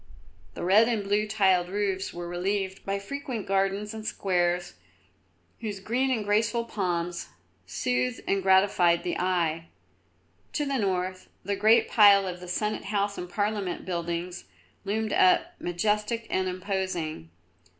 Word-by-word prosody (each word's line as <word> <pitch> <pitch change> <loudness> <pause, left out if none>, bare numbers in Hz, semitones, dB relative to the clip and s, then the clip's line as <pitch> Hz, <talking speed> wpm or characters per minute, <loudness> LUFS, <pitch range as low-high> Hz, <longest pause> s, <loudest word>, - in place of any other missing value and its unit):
The - - -5
red 205 +6 +5
and 225 -4 0
blue 205 +2 +1
tiled 190 -4 +2
roofs 195 -1 -1
were 175 0 -6
relieved 190 +2 -2
by 195 0 0
frequent 245 +1 -5
gardens 195 +2 0
and 220 -1 -7
squares 175 -4 0 0.9
whose 210 -4 -5
green 245 +7 0
and 225 -5 0
graceful 225 +3 +1
palms 175 -5 -2 0.4
soothed 125 +6 -1
and 195 0 +1
gratified 190 -3 +4
the 175 - -2
eye. 170 -3 0 0.9
To 295 - 0
the 275 -2 -1
north 185 -2 -2
the 200 +1 -1
great 220 +3 +4
pile 200 -3 +6
of 180 -1 -5
the 180 - -10
Senate 210 +4 -2
House 200 0 -1
and 180 - -6
Parliament 205 -1 -2
buildings 170 - -4 0.4
loomed 215 +2 -1
up 185 - +4
majestic 210 +6 -1
and 185 0 +1
imposing. 180 - -3
195 Hz, 140 wpm, -27 LUFS, 180-210 Hz, 0.9 s, pile